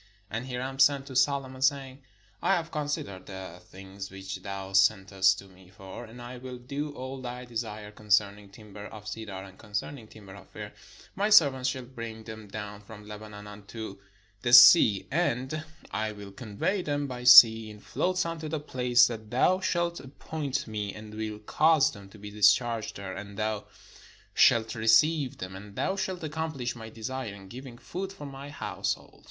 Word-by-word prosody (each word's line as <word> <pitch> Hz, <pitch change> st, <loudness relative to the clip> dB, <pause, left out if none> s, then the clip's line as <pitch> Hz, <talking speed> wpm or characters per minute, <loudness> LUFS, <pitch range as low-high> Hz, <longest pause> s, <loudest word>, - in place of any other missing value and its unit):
And 115 Hz, +4 st, -4 dB
Hiram 130 Hz, +1 st, -4 dB
sent 135 Hz, 0 st, +4 dB
to 130 Hz, -, -9 dB
Solo 135 Hz, +1 st, +2 dB
mon, 130 Hz, 0 st, -11 dB
saying: 135 Hz, 0 st, 0 dB, 0.4 s
"I 195 Hz, -, +3 dB
have 165 Hz, -2 st, -3 dB
considered 145 Hz, -, -4 dB
the 95 Hz, -3 st, -8 dB
things 95 Hz, +2 st, -10 dB
which 95 Hz, 0 st, -7 dB
thou 95 Hz, 0 st, -6 dB
sen 95 Hz, +1 st, +4 dB
test 95 Hz, 0 st, +3 dB
to 100 Hz, -, -10 dB
me 95 Hz, -1 st, -18 dB
for: 95 Hz, +4 st, -10 dB
and 115 Hz, +2 st, -13 dB
I 120 Hz, +1 st, -8 dB
will 125 Hz, 0 st, -7 dB
do 140 Hz, +4 st, -5 dB
all 130 Hz, +1 st, -6 dB
thy 125 Hz, 0 st, -6 dB
desire 110 Hz, -3 st, -5 dB
concern 105 Hz, -1 st, +1 dB
ing 100 Hz, -1 st, -15 dB
timber 105 Hz, 0 st, -11 dB
of 105 Hz, -1 st, -11 dB
cedar, 105 Hz, -3 st, -6 dB
and 95 Hz, 0 st, -14 dB
concerning 110 Hz, +3 st, -5 dB
timber 100 Hz, -3 st, -13 dB
of 100 Hz, -1 st, -14 dB
fir. -, -, -8 dB, 0.4 s
My 205 Hz, +2 st, +1 dB
servants 140 Hz, -10 st, +5 dB
shall 130 Hz, 0 st, -4 dB
bring 115 Hz, -3 st, -8 dB
them 110 Hz, -1 st, -9 dB
down 105 Hz, 0 st, -7 dB
from 105 Hz, 0 st, -12 dB
Lebanon 105 Hz, -1 st, -9 dB
unto 105 Hz, 0 st, -9 dB, 0.4 s
the 120 Hz, -1 st, 0 dB
sea: 115 Hz, -, +9 dB
and 150 Hz, -1 st, -1 dB, 0.3 s
I 110 Hz, +1 st, -2 dB
will 100 Hz, -1 st, -10 dB
convey 110 Hz, -, -2 dB
them 145 Hz, -3 st, -2 dB
by 125 Hz, -2 st, -6 dB
sea 115 Hz, -3 st, +9 dB
in 105 Hz, -1 st, -11 dB
floats 185 Hz, -, -1 dB
unto 165 Hz, -2 st, -4 dB
the 155 Hz, 0 st, -2 dB
place 125 Hz, -4 st, +3 dB
that 110 Hz, -3 st, -5 dB
thou 180 Hz, +10 st, +3 dB
shalt 175 Hz, -2 st, -1 dB
appoint 140 Hz, +1 st, -4 dB
me, 105 Hz, -3 st, -4 dB
and 105 Hz, 0 st, -10 dB
will 110 Hz, -1 st, -4 dB
cause 150 Hz, +7 st, +3 dB
them 100 Hz, -1 st, -12 dB
to 105 Hz, -, -15 dB
be 105 Hz, 0 st, -9 dB
discharged 105 Hz, +2 st, +3 dB
there, 95 Hz, -1 st, -6 dB
and 100 Hz, 0 st, -8 dB
thou 110 Hz, -1 st, -2 dB, 0.7 s
shalt 115 Hz, -1 st, +4 dB
receive 125 Hz, +6 st, +3 dB
them: 95 Hz, 0 st, -7 dB
and 100 Hz, +1 st, -11 dB
thou 190 Hz, -, 0 dB
shalt 190 Hz, -2 st, -3 dB
accompHsh 155 Hz, -5 st, -3 dB
my 110 Hz, -1 st, -9 dB
desire, 115 Hz, -1 st, -5 dB
in 95 Hz, -1 st, -13 dB
giving 125 Hz, +1 st, -9 dB
food 190 Hz, +8 st, -6 dB
for 170 Hz, -7 st, -10 dB
my 140 Hz, 0 st, -8 dB
household." 145 Hz, -, -4 dB
115 Hz, 180 wpm, -28 LUFS, 105-135 Hz, 0.7 s, sea